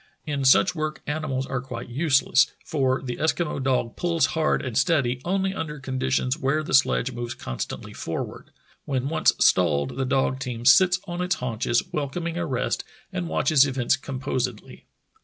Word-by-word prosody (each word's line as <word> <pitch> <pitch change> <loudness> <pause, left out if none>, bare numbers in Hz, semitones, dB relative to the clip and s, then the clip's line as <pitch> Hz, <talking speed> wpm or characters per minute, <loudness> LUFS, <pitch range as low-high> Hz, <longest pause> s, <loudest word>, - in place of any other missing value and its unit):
In 145 -3 -2
such 135 +8 +5
work 155 -2 -4
animals 150 -3 -2
are 135 -2 -3
quite 120 -2 -7
useless, 135 -2 +3
for 135 -4 0
the 125 -2 -4
Eskimo 160 -2 -1
dog 130 -3 0
pulls 170 -2 +1
hard 160 -3 +1
and 125 -3 -4
steady 130 -2 +2
only 190 +1 0
under 150 -5 -5
conditions 130 +1 -1
where 145 +3 0
the - - -5
sledge 130 -1 +3
moves 120 0 -5
constantly 60 - -6
forward. - - -5 0.4
When 135 -1 -1
once 160 - +3
stalled 75 - +2
the 135 - 0
dog 130 0 +1
team 120 -3 -5
sits 180 +8 +6
on 175 -1 -4
its 180 +1 +1
haunches, 120 - -1
welcoming 165 +4 -3
a 175 -1 -2
rest, 130 -3 -1 0.3
and 85 -2 -3
watches 130 - +4
events 130 -2 +1
composedly. 130 -4 -4
135 Hz, 160 wpm, -25 LUFS, 125-155 Hz, 0.4 s, sits